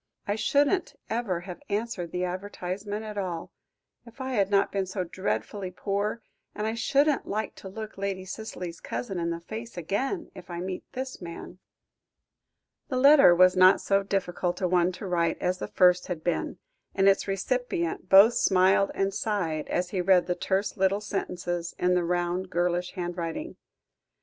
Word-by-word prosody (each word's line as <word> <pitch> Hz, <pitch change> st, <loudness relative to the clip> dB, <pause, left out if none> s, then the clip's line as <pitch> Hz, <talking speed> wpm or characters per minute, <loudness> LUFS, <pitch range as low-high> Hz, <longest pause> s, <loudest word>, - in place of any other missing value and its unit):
"I 205 Hz, -, +1 dB
shouldn't 290 Hz, -, +1 dB, 0.2 s
ever 215 Hz, -7 st, -1 dB
have 180 Hz, -1 st, -9 dB
answered 205 Hz, -4 st, -2 dB
the 180 Hz, -, -2 dB
advertisement 195 Hz, +3 st, -4 dB
at 210 Hz, -1 st, -5 dB
all, 175 Hz, -4 st, -4 dB, 0.5 s
if 235 Hz, +2 st, -16 dB
I 260 Hz, 0 st, -3 dB
had 200 Hz, -6 st, +1 dB
not 200 Hz, -1 st, +3 dB
been 195 Hz, -1 st, -1 dB
so 185 Hz, 0 st, -2 dB
dreadfully 180 Hz, -, -3 dB
poor, 200 Hz, +4 st, -2 dB, 0.3 s
and 210 Hz, -, -2 dB
I 220 Hz, -, 0 dB
shouldn't 280 Hz, +5 st, +2 dB
like 215 Hz, 0 st, -2 dB
to 190 Hz, -, -9 dB
look 215 Hz, +1 st, -8 dB
Lady 195 Hz, -1 st, -3 dB
Cicely's 185 Hz, -4 st, -6 dB
cousin 195 Hz, -7 st, -4 dB
in 170 Hz, 0 st, -1 dB
the 170 Hz, 0 st, -3 dB
face 225 Hz, +6 st, -8 dB
again 260 Hz, -, -2 dB
if 180 Hz, -1 st, -12 dB
I 170 Hz, -1 st, -5 dB
met 185 Hz, +1 st, -4 dB
this 260 Hz, -2 st, -5 dB
man." 175 Hz, +1 st, -8 dB, 1.3 s
The 260 Hz, -, -2 dB
letter 275 Hz, -8 st, +7 dB
was 185 Hz, +1 st, +6 dB
not 185 Hz, +1 st, +7 dB
so 195 Hz, 0 st, +2 dB
difficult 180 Hz, -2 st, -2 dB
a 185 Hz, -, +1 dB
one 180 Hz, 0 st, +3 dB
to 190 Hz, -, -8 dB
write 170 Hz, -3 st, +1 dB
as 180 Hz, 0 st, -1 dB
the -, -, -4 dB
first 180 Hz, -1 st, +4 dB
had 170 Hz, -4 st, -4 dB
been, 175 Hz, -2 st, -1 dB, 0.4 s
and 195 Hz, 0 st, +3 dB
its 195 Hz, +1 st, +4 dB
recipient 195 Hz, -4 st, -2 dB
both 200 Hz, +5 st, +8 dB
smiled 190 Hz, 0 st, +4 dB
and 195 Hz, 0 st, 0 dB
sighed, 180 Hz, -8 st, -2 dB
as 180 Hz, 0 st, -1 dB
he 185 Hz, -, 0 dB
read 180 Hz, -1 st, +4 dB
the 180 Hz, -, 0 dB
terse 190 Hz, +4 st, -1 dB
little 195 Hz, +2 st, +2 dB
sentences 175 Hz, -4 st, -3 dB
in 180 Hz, 0 st, +2 dB
the 180 Hz, -1 st, +2 dB
round, 175 Hz, +1 st, -1 dB
girlish 175 Hz, +1 st, 0 dB
handwriting. 175 Hz, -, -4 dB
190 Hz, 170 wpm, -27 LUFS, 175-210 Hz, 1.3 s, both